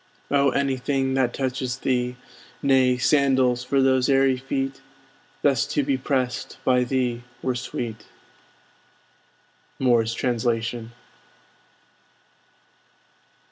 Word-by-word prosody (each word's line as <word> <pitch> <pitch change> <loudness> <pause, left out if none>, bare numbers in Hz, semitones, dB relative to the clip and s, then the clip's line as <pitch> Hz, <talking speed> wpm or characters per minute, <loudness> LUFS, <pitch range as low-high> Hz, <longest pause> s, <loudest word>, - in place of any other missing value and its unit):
Oh, 140 -1 +4
anything 135 0 0
that 130 -2 +1
touches 130 -1 -2
thee, 125 -2 -1 0.5
Nay, 130 -2 +4
sandals 130 -2 +2
for 135 +1 +1
those 130 0 +3
airy 135 -1 +4
feet 135 +1 -3 0.6
Thus 135 -5 +2
to 145 - 0
be 135 0 +1
pressed 130 -2 -2
by 125 -1 +4
thee 125 -2 -1 0.2
were 130 - 0
sweet! 120 -2 -5 1.7
Moore's 115 -3 +2
Translation. 115 -1 -1
130 Hz, 95 wpm, -24 LUFS, 125-135 Hz, 1.7 s, Oh